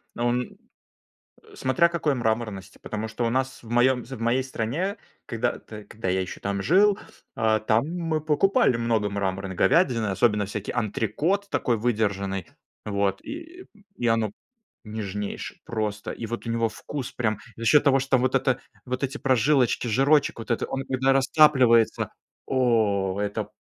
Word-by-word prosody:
Но 120 - 0
у - - +2
ме 125 0 -1 1.0
Э, - - -15
смотря 170 +7 +2
какой 160 -4 0
мраморности, 110 -5 -2
потому 110 +1 -4
что 110 +2 -4
у - - +1
нас 130 +2 -1
в 115 - -13
моём 125 +1 +3
з 130 - -10
в - - -11
моей 120 +3 +2
стране, 140 - -2 0.3
когда 120 +1 -1
т 105 -1 -10
когда 105 0 -7
я 95 +1 +1
еще 95 - -6
там 100 0 -2
жил, 195 - +4 0.4
а, 110 -3 +2
там 110 +3 +2
мы 165 -2 -2
покупали 160 - +3
много 115 -3 0
мраморной 95 -1 -2
говядины, 120 - +3
особенно 105 +1 +2
всякий 105 0 -4
антрекот, 125 - -1
такой 120 -2 +1
выдержанный, 100 -5 -1 0.4
вот. 100 -2 0
И 335 +4 -9 0.3
и 120 - -2
оно 115 -2 +2 0.5
нежнейшее 105 -2 -5
просто, 105 -2 -3
и 115 - -5
вот 120 +2 -5
у - - -2
него 115 0 +1
вкус 130 +4 -6
прям 110 -4 -1 0.2
За 115 - -6
счёт 140 +6 +6
того, 135 -2 +4
что 135 0 +2
вот 130 +1 0
эта 130 -1 +2 0.2
вот 125 +1 -4
эти 140 +1 -2
прожилочки, 130 -1 +2
жирочек 135 +6 +3
вот 115 - -9
это, 115 - 0
он 135 0 -3
когда 130 +1 +1
растапливается. 130 -4 +4 0.3
О! 110 -7 +1
Это 105 0 -2
120 Hz, 165 wpm, -25 LUFS, 105-135 Hz, 1.0 s, счёт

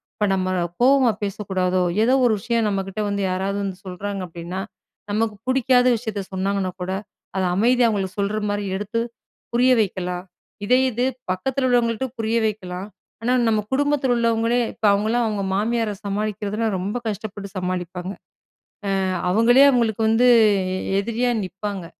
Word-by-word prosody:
இப்ப 210 - 0
நம்ம 185 -1 0 0.3
கோவமா 260 -2 +5
பேசக்கூடாதோ! 185 -2 -1 0.2
ஏதோ 250 +3 +3
ஒரு 230 - +4
விஷயம் 230 0 0
நம்மக்கிட்ட 195 +1 -3
வந்து 200 0 -1
யாராவது 195 +2 -1
வந்து 190 -2 -4
சொல்றாங்க 195 +2 -4
அப்பிடின்னா, 175 +3 -6 0.5
நமக்கு 215 0 0
புடிக்காத 255 -1 +3
விஷயத்த 220 -3 -4
சொன்னாங்கன்னா 190 0 -1
கூட, 185 +1 -3 0.4
அத 190 - 0
அமைதியா 240 +3 +4
அவுங்களுக்கு 195 -2 -2
சொல்றமாரி 205 0 -1
எடுத்து 210 +3 -2 0.5
புரிய 250 +2 +4
வைக்கலாம். 180 -2 -3 0.4
இதே 250 +4 +4
இது 245 +3 0 0.3
பக்கத்துல 260 +8 -1
உள்ளவங்கள்ட்ட 240 +1 +1
புரிய 225 +1 +1
வைக்கலாம். 190 -2 -5 0.3
ஆனா, 245 +2 +1
நம்ம 220 -1 +3
குடும்பத்துல 285 -1 +1
உள்ளவங்களே 230 0 +1 0.2
இப்ப - - -31
அவுங்கள்லாம் 220 +4 +1
அவுங்க 205 -2 -2
மாமியார 225 +1 0
சமாளிக்கிறதுனா, 210 +2 -2
ரொம்ப 200 +6 -2
கஷ்டப்பட்டு 205 -1 -5
சமாளிப்பாங்க. 180 0 -3 0.9
அ - - 0 0.3
அவுங்களே 235 +6 +5
அவுங்களுக்கு 225 -4 +1
வந்து 230 +3 +4 0.5
எ - - -2 0.2
எதிரியா 235 +4 0
நிப்பாங்க. 195 0 -5
210 Hz, 135 wpm, -22 LUFS, 190-235 Hz, 0.9 s, கோவமா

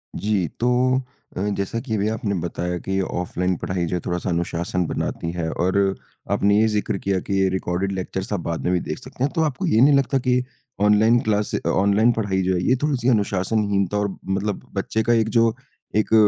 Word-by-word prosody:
जी, 100 -5 0
तो 125 +2 +2 0.4
अ, - - -1 0.2
जैसा 100 +4 -2
कि 115 -3 -3
अभी 105 +1 0
आपने 110 -2 -2
बताया 90 +1 -3
कि 95 0 0
ऑफलाइन 90 0 -1
पढ़ाई 90 -2 -1
जो 90 - -2
है - - 0
थोड़ा-सा 90 +1 -2
अनुशासन 85 +1 -1
बनाती 85 - -3
है 85 -2 -3
और 90 +2 0 0.6
आपने 100 +1 +3
ये 110 - +4
ज़िक्र 105 -2 -1
किया 95 0 0
कि 100 - -1
ये 95 - +3
रिकॉर्डेड 95 +1 -1
लेक्चर्स 95 +1 -4
आप 100 - 0
बाद 85 -1 -2
में 90 - +2
भी 90 - +2
देख 75 - -3
सकते 130 0 -6
हैं। 140 - +1
तो 165 - +1
आपको 155 +3 -1
ये 115 -9 +3
नहीं 145 +2 +6
लगता 135 0 +1
कि 125 0 +2 0.4
ऑनलाइन 110 +3 +5
क्लास 105 -1 0
अ, - - -1
ऑनलाइन 100 +4 +3
पढ़ाई 100 -4 0
जो 95 - +1
है 90 - 0
ये 130 - +4
थोड़ी-सी 130 -4 +1
अनुशासनहीनता 100 -2 +1
और 100 -2 -1
मतलब 100 +1 -1
बच्चे 110 +3 -1
का 120 - +3
एक 110 -1 +2
जो 115 0 +4 0.4
एक 110 +1 +1
100 Hz, 205 wpm, -22 LUFS, 95-115 Hz, 0.6 s, नहीं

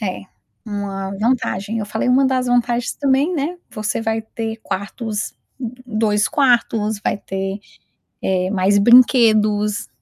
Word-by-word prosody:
É, 190 -4 -3 0.4
uma 200 -2 -4
vantagem, 225 -2 -1
eu 210 - -3
falei: 220 +4 -2
"Uma 265 +2 +4
das 255 -1 0
vantagens 245 0 +1
também, 280 +5 +1
né, 320 +4 -2
você 215 0 -3
vai 225 0 -1
ter 225 0 -5
quartos 205 +2 -4 0.5
2 215 -2 +1
quartos, 230 -6 +1
vai - - 0
ter, 195 0 -4 0.6
eh, 185 0 0
mais 200 +1 +2
brinquedos, 215 -3 +4
220 Hz, 125 wpm, -19 LUFS, 205-245 Hz, 0.6 s, Uma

